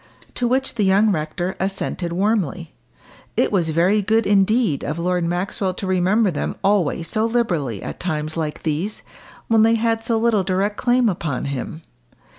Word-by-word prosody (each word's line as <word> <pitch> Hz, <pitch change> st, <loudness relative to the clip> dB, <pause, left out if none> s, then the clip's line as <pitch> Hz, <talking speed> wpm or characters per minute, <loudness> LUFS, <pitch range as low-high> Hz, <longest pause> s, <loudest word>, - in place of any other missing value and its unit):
To 245 Hz, -, 0 dB
which 265 Hz, +2 st, 0 dB
the 220 Hz, -, 0 dB
young 200 Hz, +3 st, +4 dB
rector 175 Hz, +2 st, -2 dB
assented 190 Hz, -2 st, -2 dB
warmly. 195 Hz, -, -1 dB, 0.6 s
It -, -, +2 dB
was 175 Hz, -5 st, +1 dB
very 180 Hz, +7 st, +2 dB
good, 220 Hz, +2 st, +2 dB
indeed, 205 Hz, -, +2 dB
of 150 Hz, -, -3 dB
Lord 180 Hz, +1 st, 0 dB
Maxwell 185 Hz, +2 st, -2 dB
to 195 Hz, -, -5 dB
remember 190 Hz, +3 st, +2 dB
them 150 Hz, -, -3 dB
always 180 Hz, -5 st, +1 dB
so 215 Hz, -, 0 dB
liberally 170 Hz, -, -1 dB
at -, -, -6 dB
times 155 Hz, -3 st, -3 dB
like 155 Hz, -2 st, -4 dB
these, 165 Hz, +7 st, -2 dB, 0.4 s
when 225 Hz, -1 st, +4 dB
they 225 Hz, +1 st, +5 dB
had 225 Hz, 0 st, 0 dB
so 230 Hz, 0 st, +1 dB
little 225 Hz, -2 st, +2 dB
direct 195 Hz, +3 st, 0 dB
claim 245 Hz, -1 st, +2 dB
upon 165 Hz, -, -2 dB
him. 140 Hz, +4 st, -5 dB
190 Hz, 165 wpm, -21 LUFS, 170-220 Hz, 0.6 s, they